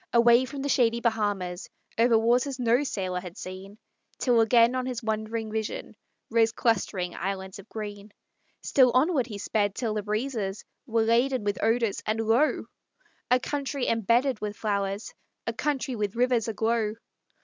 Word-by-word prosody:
Away 235 +1 +6
from 270 +2 -6
the - - -1
shady 235 -3 +3
Bahamas, 205 -6 -1 0.3
Over 230 0 +4
waters 245 +4 +2
no 240 +3 +3
sailor 185 -8 -2
had 180 -1 -10
seen, 190 +2 -8 0.4
Till 240 -3 +3
again 230 +1 +5
on 255 0 -2
his 250 -2 -4
wondering 220 0 -2
vision, 220 -1 -4 0.4
Rose 225 0 +4
clustering 190 -6 0
islands 190 +1 -4
of 195 - -13
green. 205 -1 -7 0.5
Still 260 -2 +5
onward 270 -2 +3
he 210 -4 -6
sped 205 -1 0
till 230 -3 -2
the 210 - -1
breezes 215 -1 -3 0.2
Were 225 -1 +2
laden 240 +2 +2
with 205 0 -2
odors, 225 -2 +1
and 215 +1 -1
lo! 225 +7 +2 0.6
A 250 - +5
country 280 0 -3
embedded 230 +3 +2
with 210 -1 -4
flowers, 200 -1 -2 0.3
A - - -2
country 275 -3 -2
with 210 -2 -2
rivers 245 -1 +2
aglow! 220 0 0
225 Hz, 155 wpm, -27 LUFS, 205-245 Hz, 0.6 s, Away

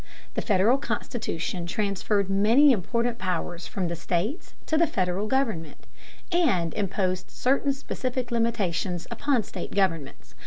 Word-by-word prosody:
The - - -1
Federal 215 +5 +3
Constitution 175 - -3
transferred 200 +1 0
many 220 +9 +5
important 235 +3 0
powers 175 -2 -3
from 185 -3 -2
the 170 - -2
states 180 - -2
to 315 - 0
the 335 +1 +4
Federal 190 - -1
government, 220 - -1 0.5
and 195 - +2
imposed 185 -2 -1
certain 275 +2 +1
specific 255 -2 -3
limitations 200 -7 0
upon 250 0 +1
state - - -7
governments. 165 -8 -1
205 Hz, 125 wpm, -26 LUFS, 180-245 Hz, 0.5 s, many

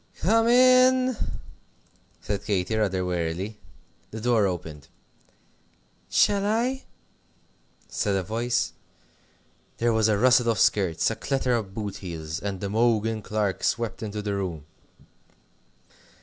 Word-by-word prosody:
"Come 225 +6 +3
in!" 255 +1 +5 1.1
said 100 -1 -3
Katy, 100 +1 -1
rather 95 -4 0
wearily. 90 +4 -3 0.5
The 110 - -7
door 110 -3 +2
opened. 80 -5 -6 1.2
"Shall 200 -1 +3
I?" 240 +6 0 1.0
said 100 -1 -1
a 95 - 0
voice. 115 +5 -1 1.0
There 115 0 +1
was 110 -1 +3
a 105 -2 +2
rustle 125 +1 +4
of 115 - +1
skirts, 95 -2 +2
a - - -3
clatter 135 -1 -1
of 105 -5 -2
boot 105 -3 -4
heels, 80 -2 -6
and 100 -1 -5
Imogen 110 +1 +1
Clark 105 -2 -2
swept 115 -5 -1
into 105 -1 -5
the 100 -1 -2
room. 90 -7 -4
110 Hz, 120 wpm, -25 LUFS, 95-120 Hz, 1.2 s, in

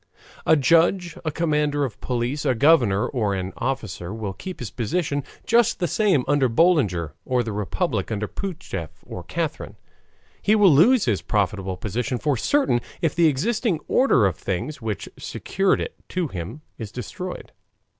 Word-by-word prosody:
A 160 - +7
judge, 170 +4 +3
a 160 - -1
commander 150 -2 +1
of 120 - -8
police, 125 +3 -2
a 130 - +2
governor, 120 -7 +4
or 105 -7 -1
an 95 0 -4
officer 110 -9 -3
will 105 -3 -4
keep 185 - -7
his 115 -6 -6
position 145 +4 -1 0.2
just 235 -1 +3
the 175 - 0
same 180 - +2
under 145 -3 +3
Boulanger 115 - +2
or 125 -1 +1
the 110 - -4
republic, 105 +2 -2
under 105 -1 -2
Pougachef 160 - -5 0.2
or - - -7
Catherine. - - -4 0.7
He 215 - +3
will 200 -6 +6
lose 220 - +5
his 110 -6 +1
profitable 95 -2 -1
position 115 +6 -2
for 145 +2 0
certain, 200 - +2 0.2
if 160 - +2
the 170 -1 +4
existing 190 - 0
order 190 - +4
of 95 -4 0
things 130 +10 -4
which 110 -4 -3
secured 195 0 0
it - - -4 0.2
to 180 -4 -1
him 100 - -6 0.2
is 110 -3 -6
destroyed. 180 - -6
135 Hz, 160 wpm, -23 LUFS, 105-170 Hz, 0.7 s, A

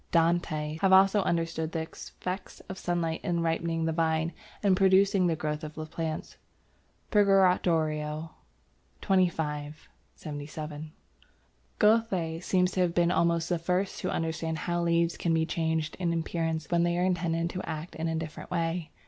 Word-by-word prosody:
Dante 170 +1 +3 0.2
seems 155 +1 -6
to - - -17
have 190 -1 +4
also 195 +2 +6
understood 165 -2 -1
the 160 - -1
effect 185 +3 -7
of 190 - -6
sunlight 170 -2 -1
in 170 -3 0
ripening 165 0 0
the 160 - +1
vine 160 0 0 0.3
and 195 -2 +4
producing 195 0 +4
the 165 - +1
growth 150 0 -3
of 155 0 -7 0.2
plants 160 -1 -4 0.7
(Purgatorio, 165 -6 +2 0.7
xxv. 160 -6 +1 0.4
77). 150 +1 -7 0.9
Goethe 195 -7 +2
seems 180 0 +2
to 185 - -3
have 170 -2 +1
been 175 0 +3
almost 170 -1 +2
the 175 -1 0
first 180 +3 -1
to - - -2
understand 160 0 -2
how 175 +2 -1
leaves 170 0 +1
can 165 -1 +1
be 160 0 +2
changed 160 -1 -1
in 175 -2 0
appearance 165 -1 -2
when 170 -1 +3
they 175 0 +1
are 180 - +2
intended 170 -2 0
to 185 - -5
act 160 +2 -5
in 165 +1 -3
a 160 - -1
different 160 -1 -6
way. 165 0 -1
165 Hz, 155 wpm, -29 LUFS, 160-180 Hz, 0.9 s, also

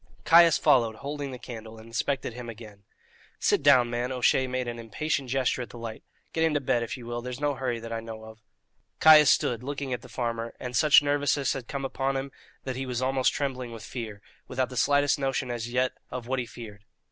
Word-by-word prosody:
Caius 170 0 +7
followed, 115 -4 +3
holding 140 +3 -5
the 130 - -7
candle, 115 -2 -9
and 110 - -12
inspected 120 +2 -2
him 120 0 -7
again. 105 -3 -11 0.6
"Sit - - +2
down, 130 -4 +6
man." 120 +2 -2
O'Shea 130 +1 +2
made 130 -1 -2
an 120 0 -5
impatient 130 +4 -2
gesture 130 0 0
at 120 - -6
the - - -11
light. 115 -1 -7 0.3
"Get 160 - +1
into 155 -2 +2
bed, 130 -3 +1
if 115 - -4
ye 125 - -10
will; 120 0 -4
there's 125 +1 -6
no 145 0 +1
hurry 130 -3 -2
that 115 0 -7
I 115 - -2
know 110 -1 -8
of." 110 0 -12 0.6
Caius 155 -2 +8
stood 135 -7 +2
still, 125 - -11
looking 140 -2 -3
at 125 - -4
the - - -13
farmer, 115 -2 -3
and 125 0 -5
such 150 +3 +6
nervousness 145 -1 +1
had 130 -3 -6
come 140 -1 -4
upon 135 +1 -1
him 135 +1 -4 0.3
that 130 -1 -4
he 130 +1 -4
was 125 0 -2
almost 130 0 +2
trembling 130 -4 -3
with 115 - -9
fear, 110 -4 -7 0.2
without 130 0 -1
the 130 - -9
slightest 145 +3 +3
notion 135 -2 -1
as 120 0 -4
yet 125 +1 +1 0.2
of 125 -2 -6
what 130 +2 -1
he 120 - -3
feared. 105 -4 -11
125 Hz, 225 wpm, -27 LUFS, 115-135 Hz, 0.6 s, Caius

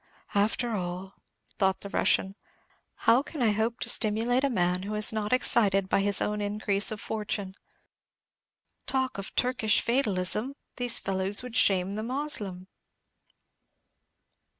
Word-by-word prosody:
"After 220 +4 0
all," 185 +1 -5 0.5
thought 190 -2 +1
the 200 - -7
Russian, 190 -1 +1 0.7
"how 230 +3 +5
can 290 -2 -5
I 220 - +3
hope 225 +3 -1
to - - -2
stimulate 230 +4 +2
a 280 - +2
man 180 -5 0
who 205 +2 -5
is 210 +1 +2
not 210 -1 -3
excited 200 -6 +3
by 195 - +2
his 200 0 +1
own 210 0 -2
increase 205 0 0
of 215 - -4
fortune? 205 -3 -4 1.3
Talk 260 -4 -1
of 195 - -7
Turkish 245 -4 +2
fatalism, 225 0 0 0.2
these 245 -2 +3
fellows 195 +3 +2
would 250 -2 -8
shame 190 -2 +2
the 215 - -3
Moslem." 220 -8 -2
210 Hz, 135 wpm, -27 LUFS, 195-240 Hz, 1.3 s, how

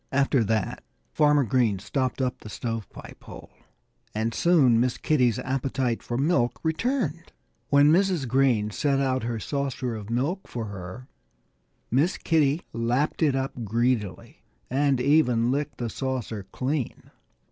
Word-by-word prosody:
After 135 -2 +2
that 110 -1 -1 0.3
Farmer 150 -1 +4
Green 115 -4 +2
stopped 130 +6 -2
up 125 -1 -2
the 110 - -10
stove 115 -1 -4
pipe - - -12
hole. - - -11 0.6
And 110 +1 -1
soon 140 -9 +4
Miss 125 +1 +1
Kitty's 125 -7 +2
appetite 130 -2 -1
for 120 - -4
milk 135 -4 +1
returned. 170 - -1 0.4
When 145 +1 +6
Mrs. 180 -5 +2
Green 120 -4 +2
set 140 +4 +1
out 130 -1 +1
her 115 -1 -3
saucer 135 -1 -3
of 105 -1 -8
milk 140 - -1
for 115 -2 -5
her 100 +5 -8 0.8
Miss 145 +9 +2
Kitty 155 0 +1
lapped 120 +8 0
it 145 -4 +3
up 135 -2 -3
greedily 115 -4 -1 0.3
and 135 0 +2
even 125 -4 +3
licked 145 +2 -2
the 120 - -3
saucer 115 -5 -4
clean. 135 -1 -3
130 Hz, 140 wpm, -26 LUFS, 115-145 Hz, 0.8 s, When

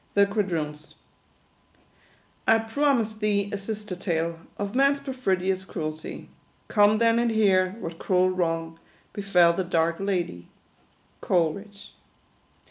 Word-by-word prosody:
THE 200 0 +6
QUADROONS. 165 -7 -3 1.5
"I 225 - +6
promised 225 -1 0
thee 205 -2 0
a - - -1
sister 210 -1 -5
tale, 170 -2 -2 0.2
Of 205 0 -4
man's 275 +2 +3
perfidious 190 -9 -1
cruelty: 155 -4 -6 0.4
Come 210 0 +4
then 230 +1 +3
and 235 0 +2
hear 190 -4 +3
what 165 -3 -7
cruel 185 0 +2
wrong 165 -2 -2 0.3
Befell 180 -4 +3
the 190 - -1
dark 165 -1 +1
Ladie." 175 - -2 0.7
Coleridge. 195 +4 -1
195 Hz, 115 wpm, -26 LUFS, 170-215 Hz, 1.5 s, THE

